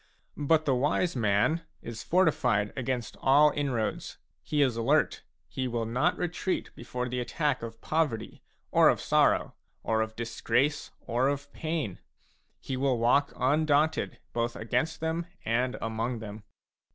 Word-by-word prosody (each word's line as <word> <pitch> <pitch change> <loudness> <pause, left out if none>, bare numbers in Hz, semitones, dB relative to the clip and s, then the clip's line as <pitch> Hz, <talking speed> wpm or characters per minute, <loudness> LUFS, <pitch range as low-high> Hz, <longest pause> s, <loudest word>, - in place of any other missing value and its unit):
a - - -9
But 155 +2 +3
the 135 - +3
wise 145 +6 +1
man 110 +8 +2 0.2
is 115 -1 -6
fortified 125 - +2
against 125 -2 -3
all 145 +3 +6
inroads; 135 -7 -2 0.2
he 145 - +1
is 130 -4 +1
alert; 130 +7 +2 0.3
he 130 +11 -3
will 120 -2 -2
not 130 +10 +1
retreat 175 +2 -2
before 125 +1 -4
the 125 0 -3
attack 130 +3 -1
of 115 0 -7
poverty, 150 -9 -1 0.3
or - - +6
of - - +2
sorrow, - - +2 0.3
or 110 0 +1
of 110 0 -3
disgrace, 120 +5 0
or 125 +3 0
of 140 0 -3
pain. 155 - -3 0.6
He 130 - -4
will 130 -1 +1
walk 125 +5 +3
undaunted 150 +3 +2 0.2
both 120 0 -1
against 125 +9 -1
them 165 +1 -1 0.2
and 125 +3 0
among 115 +2 -2
them. 105 -1 -8
130 Hz, 145 wpm, -29 LUFS, 115-150 Hz, 0.6 s, all